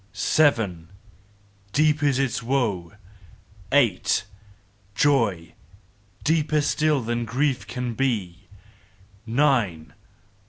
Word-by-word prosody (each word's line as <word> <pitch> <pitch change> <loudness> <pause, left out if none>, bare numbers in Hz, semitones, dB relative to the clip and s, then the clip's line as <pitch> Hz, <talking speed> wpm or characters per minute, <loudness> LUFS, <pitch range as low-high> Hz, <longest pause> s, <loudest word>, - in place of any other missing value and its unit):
Seven! 105 - +1 0.8
"Deep 150 +2 +2
is 140 -3 +2
its 135 -1 -1
woe 115 -9 -1 0.8
Eight! 120 -11 +2 0.7
"Joy 110 - +1 0.7
deeper 155 -1 +1
still 150 -1 +1
than 120 +1 -2
grief 130 +4 -1
can 125 -2 -4
be: 105 -8 -2 0.8
_Nine! 115 - +1
125 Hz, 80 wpm, -24 LUFS, 100-145 Hz, 0.8 s, Deep